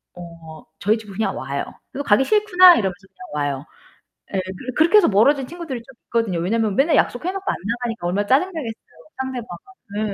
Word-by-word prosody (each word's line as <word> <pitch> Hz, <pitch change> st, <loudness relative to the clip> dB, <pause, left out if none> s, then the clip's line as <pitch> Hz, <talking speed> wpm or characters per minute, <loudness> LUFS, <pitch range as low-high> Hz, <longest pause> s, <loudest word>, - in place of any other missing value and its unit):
어 165 Hz, -3 st, -11 dB, 0.2 s
저희 215 Hz, +3 st, +2 dB
집으로 205 Hz, -3 st, -11 dB
그냥 220 Hz, -, -1 dB
와요. -, -, -3 dB, 0.3 s
"너 285 Hz, -, -4 dB
가기 220 Hz, +1 st, +4 dB
싫구나." 370 Hz, -3 st, +6 dB
이러면서 190 Hz, -, -1 dB
그냥 190 Hz, +6 st, -14 dB
와요. 145 Hz, -2 st, -2 dB, 0.7 s
예 -, -, 0 dB
그 190 Hz, +8 st, -6 dB
그렇게 335 Hz, +7 st, +5 dB
해서 405 Hz, -, +6 dB
멀어진 260 Hz, +7 st, +3 dB
친구들이 330 Hz, -6 st, -6 dB
좀 230 Hz, -, -17 dB, 0.2 s
있거든요. 230 Hz, -7 st, -1 dB
왜냐면 215 Hz, +3 st, 0 dB
맨날 295 Hz, +2 st, +3 dB
약속해 280 Hz, +9 st, +1 dB
놓고 390 Hz, 0 st, -6 dB
안 -, -, +1 dB
나가니까 235 Hz, -5 st, -3 dB
얼마나 200 Hz, +4 st, 0 dB
짜증 290 Hz, +10 st, +3 dB
나겠어요, 235 Hz, -9 st, -8 dB
상대방은. 225 Hz, -, -6 dB
230 Hz, 420 characters per minute, -21 LUFS, 190-285 Hz, 0.7 s, 싫구나